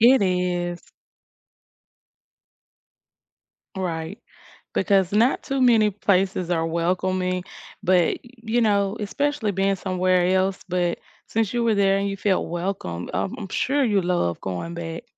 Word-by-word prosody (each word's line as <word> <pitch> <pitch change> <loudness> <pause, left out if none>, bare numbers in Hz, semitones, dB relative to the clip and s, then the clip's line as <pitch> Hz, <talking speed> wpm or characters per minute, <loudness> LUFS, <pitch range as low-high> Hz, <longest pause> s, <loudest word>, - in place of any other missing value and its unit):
It 245 +1 +6
is. 180 -2 0 3.0
Right. 165 -4 -3 0.6
Because 195 -2 +2
not 230 +5 +3
too 275 -2 -2
many 225 -4 +5
places 190 -2 0
are 165 -2 +1
welcoming, 180 +2 -1 0.4
but, 180 -3 +3
you 235 -1 -3
know, 200 -2 +2
especially 235 +2 -1
being 195 0 +1
somewhere 185 -1 +1
else, 190 +1 0
but 175 -1 0 0.3
since 220 -3 -1
you 240 -1 +1
were 225 -2 +3
there 195 -1 +3
and 200 - -1
you 195 - -3
felt 195 -1 0
welcome, 170 - -4
um, 190 - -1
I'm 195 - -6
sure 280 +8 0
you 205 -4 +2
love 175 - 0
going 95 - -4
back. 165 -1 -6
190 Hz, 130 wpm, -23 LUFS, 175-210 Hz, 3.0 s, It